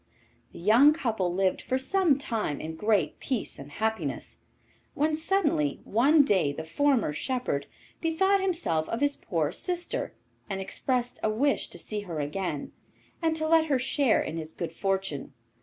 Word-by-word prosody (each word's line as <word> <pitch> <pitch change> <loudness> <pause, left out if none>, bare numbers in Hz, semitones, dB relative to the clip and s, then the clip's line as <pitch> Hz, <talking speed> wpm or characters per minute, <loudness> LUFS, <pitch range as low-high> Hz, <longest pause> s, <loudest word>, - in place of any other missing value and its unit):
The - - -12
young 230 - +6
couple 220 - -1
lived 190 +1 +1
for 260 - -1
some 325 +1 +2
time 225 - -2
in 160 +1 -5
great 210 +3 +1
peace 255 -6 -3
and 140 +1 -9
happiness, 220 +7 -3 0.6
when 310 +2 +1
suddenly 310 - +1
one 285 +8 +4
day 190 - +2
the 150 +3 -6
former 255 - +1
shepherd 245 - -2 0.3
bethought 380 +4 +2
himself 330 - 0
of 230 - -2
his 285 0 +2
poor - - -1
sister 355 -1 -3 0.3
and 195 -1 -2
expressed 245 +5 -2
a 215 - +1
wish 270 +7 +1
to - - -10
see 210 +5 -3
her 175 -6 -5
again, 150 0 -3 0.5
and 325 -1 +1
to 315 0 0
let 325 0 +5
her 285 -4 +2
share 260 -1 +2
in 160 - -5
his 160 0 -6
good 170 -2 -4
fortune. 190 -7 -2
225 Hz, 160 wpm, -28 LUFS, 175-290 Hz, 0.6 s, young